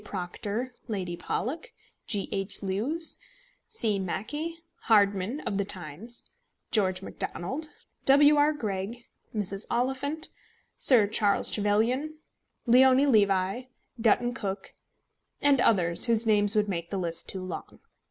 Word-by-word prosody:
Proctor, 205 +6 -4
Lady 185 -6 -3
Pollock, 300 - -4 0.3
G. 205 -3 0
H. 195 +1 -1
Lewes, 245 - -1 0.5
C. 225 - 0
Mackay, 295 - -4 0.3
Hardman 205 +4 +2
(of 200 - -3
the - - +2 0.2
Times), 180 +10 -8 0.4
George 190 -3 +1
Macdonald, 270 - -4 0.4
W. 290 +2 +7
R. 295 +1 +4
Greg, 225 -3 -4 0.3
Mrs. 200 -1 -3
Oliphant, 275 +5 -2 0.5
Sir 240 -6 +6
Charles 205 -1 +1
Trevelyan, 230 +9 +1 0.5
Leoni 260 +3 +6
Levi, 200 -2 +2 0.3
Dutton 240 +2 +2
Cook, 195 -5 -5 0.7
and 280 -3 +3
others, 175 -3 +4
whose 230 0 +2
names 205 -1 +3
would 210 -1 +2
make 170 -3 -3
the 200 - -3
list 170 -3 -2
too 190 -1 -4
long. 185 - -7
215 Hz, 120 wpm, -28 LUFS, 195-260 Hz, 0.7 s, W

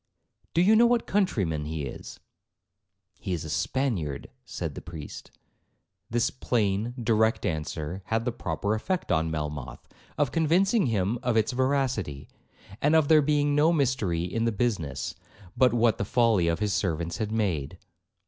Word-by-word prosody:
'Do 170 - +5
you 215 +4 +5
know 235 +2 +6
what 240 -1 +2
countryman 95 - 0
he 80 -1 -4
is?' 70 - -8 1.0
'He 95 - -3
is 80 -2 -3
a 80 - -5
Spaniard,' 105 - -2
said - - -5
the - - -8
priest. 80 -4 -9 0.8
This 120 +1 +1
plain, 115 -2 -1
direct 110 -1 +2
answer, 80 +2 -3
had 115 +2 -1
the 125 - 0
proper 100 -2 -2
effect 180 - -2
on 80 +1 +2
Melmoth, 75 -4 -5 0.3
of 145 -3 +1
convincing 180 - +2
him 110 +1 0
of 120 -2 0
its 110 +2 +2
veracity, 125 - -1 0.5
and 150 +3 +3
of 155 -3 +3
there 155 -1 +7
being 145 0 +2
no 150 +3 +4
mystery 125 - 0
in 115 +6 -1
the 115 - +2
business, 105 - -2 0.4
but 130 -1 +4
what 115 -2 +2
the - - +1
folly 115 -6 +3
of 85 0 +1
his 105 -2 0
servants 85 -2 -1
had 110 -1 -3
made. 90 -8 -1
110 Hz, 160 wpm, -27 LUFS, 85-135 Hz, 1.0 s, there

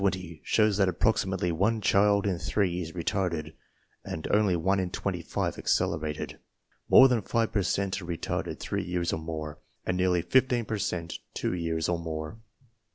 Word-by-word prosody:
(Strayer) 100 - +4
Table 95 - -4
20 85 -3 -11
shows 105 -2 +3
that 95 -2 +3
approximately 95 -1 +1
one 100 +7 +1
child 100 0 +3
in 95 -4 0
three 90 -3 0
is 80 -1 -6
retarded, 85 -3 -2 0.5
and 80 - -5
only 105 -3 +3
one 95 +4 +1
in 90 -1 -1
twenty - - -3
five - - -3
accelerated. 80 -2 -1 0.5
More 135 - +9
than 125 -4 +1
five 115 0 0
per 100 - +1
cent 100 +1 -1
are - - -8
retarded 85 -1 -3
three - - -2
years 85 -1 -1
or - - -1
more, 80 -1 -5 0.3
and 95 - 0
nearly 90 -2 +2
fifteen 125 +2 +2
per 110 0 -3
cent 85 -3 -3 0.2
two - - -1
years 85 -2 -1
or 85 -1 0
more. 80 +4 -5
90 Hz, 180 wpm, -28 LUFS, 85-100 Hz, 0.5 s, More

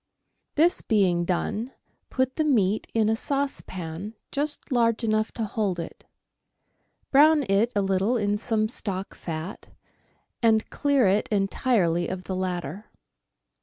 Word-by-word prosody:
This 335 +4 +4
being 185 -6 +2
done, 210 +7 -2 0.4
put 260 0 0
the 315 - +1
meat 220 -9 +2
in 220 -2 +3
a 220 - +2
saucepan 210 - -4 0.2
just 290 +1 -2
large 235 -2 +2
enough 215 0 +1
to 230 - -3
hold 205 -3 -1
it. 170 -1 -7 1.1
Brown 300 +2 +6
it 200 +5 +2
a 200 - +2
little 195 +5 +1
in 205 -1 0
some 220 -1 0
stock 195 -4 -4
fat, 165 +3 -6 0.7
and 220 -2 +3
clear 280 -4 +2
it 200 +3 +2
entirely 195 -4 +1
of 185 0 -5
the 185 - -4
latter. 180 0 -4
215 Hz, 130 wpm, -25 LUFS, 185-240 Hz, 1.1 s, Brown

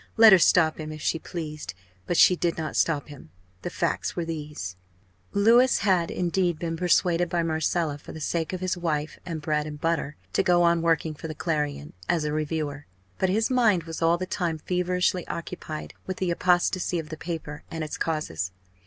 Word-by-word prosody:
Let 220 -2 +9
her 190 - +8
stop 160 -2 +4
him, 155 0 -5
if 155 - -7
she 165 +2 0
pleased! 155 - -6 0.3
but 175 - 0
she 180 - +7
did 170 -1 -1
not 155 -3 -4
stop 150 -3 +1
him. 145 - -12 0.3
The - - -3
facts - - -1
were 170 - -2
these: 150 - -5 0.6
Louis 235 +5 +5
had, 185 -4 +2
indeed, 175 -1 0
been 165 0 -3
persuaded 175 0 +2
by 170 0 0
Marcella, 160 -1 0
for - - -11
the 160 - -8
sake 160 +1 -1
of 185 -1 -4
his 185 0 0
wife 155 -4 -2
and 160 -3 -4
bread 150 0 0
and 150 -1 -7
butter, 165 -2 -1 0.2
to - - +3
go 175 -1 +4
on 170 -1 +3
working 165 -1 +1
for 155 - -7
the 155 - -6
Clarion, 150 - -2 0.2
as 165 -3 +2
a 150 - -1
reviewer. 150 -1 -3 0.3
But 190 - +2
his 220 +6 +1
mind 220 -9 +3
was 165 0 -7
all 165 +1 +4
the 185 - -3
time 175 -3 -2
feverishly 180 +1 0
occupied 155 -2 -6
with 185 - -3
the 185 -2 0
apostasy 180 +1 +2
of 160 -2 -5
the 160 - -5
paper 160 -4 -5
and 160 -1 -4
its 155 - -5
causes. 90 - -2
165 Hz, 195 wpm, -26 LUFS, 155-180 Hz, 0.6 s, Let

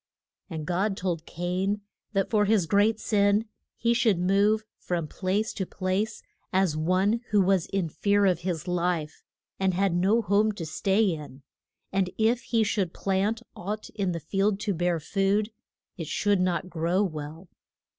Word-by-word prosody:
And 160 -3 -5
God 190 +4 0
told 175 -3 -3
Cain 185 +4 -1 0.3
that 195 -2 0
for 210 -2 +3
his 205 -4 +3
great 210 +4 +3
sin 205 0 +2 0.3
he 235 +1 +2
should 225 -5 +3
move 200 +4 +2
from 170 -3 -2
place 200 +7 -1
to 195 - -2
place, 195 +4 -2 0.3
as 190 -4 +2
one 185 +8 +1
who 210 - +3
was 190 -2 +3
in 195 -3 -1
fear 200 +5 +2
of 180 -4 +3
his 175 -2 -3
life, 175 -3 -1 0.4
and 190 -2 +1
had 195 -1 +2
no 195 +7 +3
home 210 +2 +2
to 175 -5 -6
stay 195 +6 +1
in. 150 -8 -3 0.5
And 190 -1 +1
if 230 +2 +2
he 230 -2 +2
should 200 -4 -1
plant 200 +4 0
aught 210 +4 -5
in 195 -4 -1
the 170 - -3
field 195 +5 0
to 205 -2 0
bear 175 -1 0
food, 200 +6 0 0.5
it 165 -4 -5
should 205 +3 +1
not 180 0 0
grow 175 +3 0
well. 155 0 -5
195 Hz, 165 wpm, -27 LUFS, 175-205 Hz, 0.5 s, for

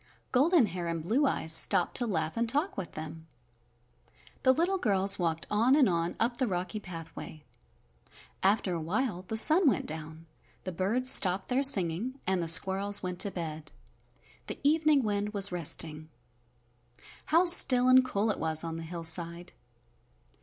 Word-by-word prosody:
Golden 290 +2 +2
Hair 180 -3 -7
and 165 -1 -5
Blue 250 - -1
Eyes 160 -10 -1
stopped 175 +2 +3
to 245 - -4
laugh 160 -6 -4
and 230 0 -3
talk 295 - -2
with 190 -3 -8
them. 160 +1 -10 1.1
The 260 - +2
little 350 +7 -2
girls 195 - +3
walked 165 -2 -3
on 230 +6 +1
and 285 -5 +2
on 170 -1 -3
up 240 +1 -2
the 255 - -2
rocky 185 +2 -5
pathway. 165 -4 -11 1.0
After 195 -1 -1
a 165 - -5
while 185 +2 -4
the 220 - -4
sun 310 - +6
went - - -3
down, 160 +1 -9 0.4
the 185 - -7
birds 215 +9 -1
stopped 190 0 +3
their 255 +2 -1
singing, 225 +1 0
and 190 -1 -2
the 170 - -5
squirrels 195 +4 +3
went 180 -1 -7
to 200 - +2
bed. 160 -5 -8 0.8
The - - -7
evening 300 -1 +1
wind 210 0 -4
was 200 -1 +4
resting. 155 -2 +2 1.2
How 335 +3 +2
still 255 -8 +6
and 255 0 +4
cool 220 -3 -3
it - - -7
was 160 0 -1
on 165 -1 -7
the - - -8
hillside! 170 +1 -3
190 Hz, 160 wpm, -27 LUFS, 165-250 Hz, 1.2 s, sun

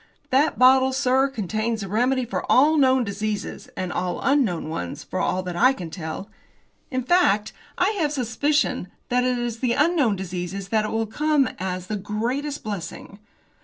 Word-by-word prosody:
"That 280 +4 +3
bottle, 260 +1 +5
sir, 265 +1 +2
contains 220 -2 -2
a - - -5
remedy 250 +5 +1
for 235 - -3
all 295 +5 +5
known 260 -3 +4
diseases, 210 0 -4
and 185 -1 -3
all 180 0 -2
unknown 250 - +1
ones, 90 - -5
for 185 - -4
all 185 0 0
that 180 -1 -5
I 255 +10 +5
can 175 -9 -7
tell. 160 +3 -6 0.6
In 255 -3 -2
fact, 235 - +2 0.2
I 365 +3 +3
have 305 -3 +2
a - - -5
suspicion 255 -1 0 0.2
that 250 0 +2
it 250 0 +1
is 240 -1 -3
to - - -22
the 245 -2 +2
unknown 290 - +2
diseases 185 +1 -5
that 215 0 +1
it - - -3
will 225 0 0
come 290 +4 +1
as 185 -1 -3
the 210 +3 -3
greatest 240 +9 -3
blessing. 200 -1 -6
230 Hz, 180 wpm, -24 LUFS, 195-265 Hz, 0.6 s, bottle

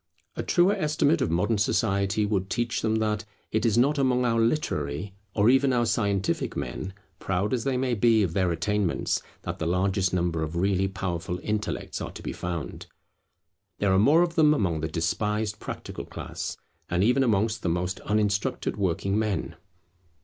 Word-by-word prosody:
A - - -2
truer 180 +3 +3
estimate 155 -1 +1
of - - +1
modern 100 +6 +1
society 100 +1 +1
would 100 -2 -1
teach 120 0 -1
them 110 0 +1
that 110 -1 0 0.3
it 110 +1 +1
is 110 0 +2
not 140 +4 +3
among 125 -2 +2
our 115 -1 +2
literary, 95 - -1 0.2
or 100 +1 +3
even 135 +2 +4
our 120 -1 +2
scientific 100 -4 0
men, 95 0 -4 0.2
proud 95 +4 -1
as 120 -1 -1
they 135 -2 +1
may 125 -1 0
be 115 -1 +4
of 85 -4 -1
their 90 -1 +1
attainments, 95 +2 0 0.2
that - - -5
the 80 - -1
largest 95 +1 +1
number 85 -3 0
of 80 +1 -3
really 95 +2 +1
powerful 90 -2 -3
intellects 105 -1 -3
are - - -4
to - - -10
be - - -4
found. 85 -7 -5 0.9
There 100 -2 +2
are 95 - +4
more 150 +11 +5
of 170 -1 -1
them 155 -3 +5
among 85 - 0
the 80 - -1
despised 105 +7 -1
practical - - -6
class, - - -6 0.3
and 90 +2 +1
even 125 +5 +3
amongst 110 -1 +1
the 90 - 0
most 90 +2 -1
uninstructed 105 -1 0
working 95 +1 0
men. 105 -6 -2
105 Hz, 175 wpm, -26 LUFS, 90-115 Hz, 0.9 s, more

